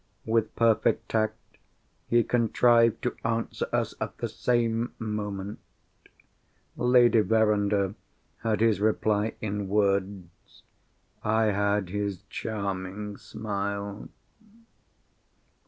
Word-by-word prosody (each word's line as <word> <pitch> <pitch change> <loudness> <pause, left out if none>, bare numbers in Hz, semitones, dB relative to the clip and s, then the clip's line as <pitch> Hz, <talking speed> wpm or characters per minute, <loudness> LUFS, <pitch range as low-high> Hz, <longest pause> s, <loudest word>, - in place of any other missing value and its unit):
With 110 -1 0
perfect 115 -1 +2
tact, 110 -1 0 0.7
he 120 0 +4
contrived 115 0 +3
to 125 - -1
answer 115 0 -2
us - - 0
at - - -4
the - - -2
same 120 -1 0
moment. 105 -2 -4 1.2
Lady 125 -2 +5
Verinder 105 -2 +2 0.5
had 110 -2 -1
his 110 -4 +3
reply 110 0 +1
in 105 -2 -3
words. 100 -3 -2 0.6
I 110 0 +2
had 100 -1 0
his 100 -1 -3
charming 100 -1 -4
smile. 100 -1 -4
105 Hz, 90 wpm, -27 LUFS, 100-115 Hz, 1.2 s, Lady